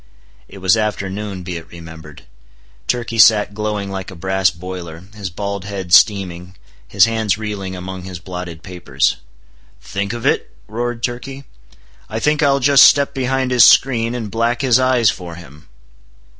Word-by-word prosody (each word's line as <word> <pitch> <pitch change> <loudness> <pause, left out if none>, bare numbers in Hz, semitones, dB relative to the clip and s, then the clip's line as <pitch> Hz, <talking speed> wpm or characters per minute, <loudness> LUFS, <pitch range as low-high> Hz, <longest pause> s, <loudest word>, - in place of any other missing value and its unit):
It - - -13
was 95 +2 +3
afternoon, 105 -2 -3
be 90 -1 -5
it 80 - -11
remembered. 80 -3 -12 0.6
Turkey 115 -2 -2
sat 105 -1 +5
glowing 105 -1 -3
like 95 -1 -6
a 95 - -10
brass 95 +2 +1
boiler, 85 -2 -8
his 100 -3 -6
bald 100 +1 -5
head 95 -4 -5
steaming, 90 -2 +3 0.3
his - - +4
hands 110 -3 -1
reeling 100 -3 -5
among 95 +1 -7
his 90 -1 -8
blotted 90 -2 -8
papers. 90 -1 -1 0.6
"Think 100 0 -4
of 120 -1 -6
it?" - - 0
roared 120 +2 -4
Turkey; 135 +3 -5 0.7
"I 110 - -4
think 150 +5 +1
I'll 140 -1 +3
just 140 0 +5
step 140 -1 +2
behind 130 -1 -1
his 125 -2 +6
screen, 120 -2 +4
and 110 -4 -5
black 115 +3 -1
his 130 -2 +4
eyes 130 -4 +3
for 85 -2 -9
him!" 75 -3 -14
100 Hz, 155 wpm, -18 LUFS, 90-120 Hz, 0.7 s, his